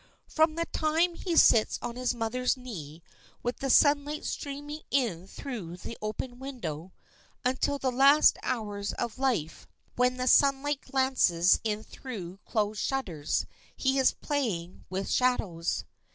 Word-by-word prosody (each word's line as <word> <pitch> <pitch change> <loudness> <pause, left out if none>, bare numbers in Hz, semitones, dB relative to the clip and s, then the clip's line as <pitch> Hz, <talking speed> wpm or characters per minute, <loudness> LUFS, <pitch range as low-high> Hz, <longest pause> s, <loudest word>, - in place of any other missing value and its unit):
From 315 0 +2
the 335 0 -1
time 325 +3 +1
he 340 0 -3
sits 225 -8 +5
on 235 - -5
his 250 0 -1
mother's 250 +3 0
knee, 170 - -8 0.4
with 245 +1 -2
the 270 - -3
sunlight 290 +2 +3
streaming 290 +2 -5
in 205 -10 0
through 200 -10 -7
the 230 - -7
open 245 +4 -5
window, 205 - -6 0.5
until 260 +3 +1
the 265 -2 -1
last 275 +4 +6
hours 205 -4 -3
of 235 +2 -4
life, 235 - -1 0.3
when 250 +1 +2
the 255 - -1
sunlight 275 +2 +3
glances 260 -10 +3
in 215 -1 -2
through 195 -10 -8
closed 210 -2 -1
shutters, 185 - -1 0.3
he 265 0 +1
is 265 - +5
playing 205 - -3
with 190 +2 -3
shadows. 195 -10 0
250 Hz, 135 wpm, -29 LUFS, 200-275 Hz, 0.5 s, last